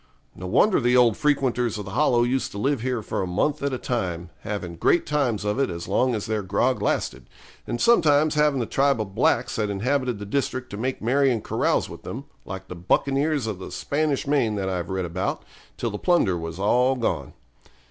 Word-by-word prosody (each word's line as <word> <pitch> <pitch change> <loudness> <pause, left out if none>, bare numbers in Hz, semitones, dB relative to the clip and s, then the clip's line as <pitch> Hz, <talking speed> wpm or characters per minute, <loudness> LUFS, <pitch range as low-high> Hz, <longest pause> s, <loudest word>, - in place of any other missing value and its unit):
No 90 - -7
wonder 180 - +4
the 125 +1 +3
old 120 -3 +5
frequenters 125 -6 +1
of 105 - -6
the 100 - -7
Hollow 120 -1 +3
used 130 +2 0
to - - -6
live 135 +3 0
here 125 -3 -2
for - - -2
a 95 - -2
month 140 +12 0
at 140 0 0
a 130 - -2
time, 90 -9 -3
having 95 -5 -5
great 170 - +2
times 130 -8 0
of 105 +5 0
it 135 - +2
as 85 0 -6
long 125 +6 +2
as 105 - -3
their 110 -1 -1
grog 105 +7 0
lasted; - - -1 0.4
and 120 - -3
sometimes 155 - +4
having 150 -2 +2
the 120 - 0
tribe 135 +1 +2
of 100 -3 -4
blacks - - +1
that 105 -2 0
inhabited 125 +4 0
the 105 - -7
district 130 +2 -2
to - - -5
make 130 +2 -3
merry 135 +4 +3
and 115 -4 -2
carouse - - +1
with - - -10
them, - - -7 0.2
like 95 0 -7
the 90 - -7
buccaneers 140 - +1
of 105 -4 -4
the - - -7
Spanish 150 0 -1
Main 135 -7 +1
that 95 -2 -2
I've 90 -2 -3
read 95 -1 -2
about, 90 +2 -3 0.3
till 115 - -2
the 105 - -5
plunder 170 - +2
was 80 0 -5
all 125 +7 +3
gone. 85 - -2
120 Hz, 215 wpm, -24 LUFS, 100-140 Hz, 0.4 s, old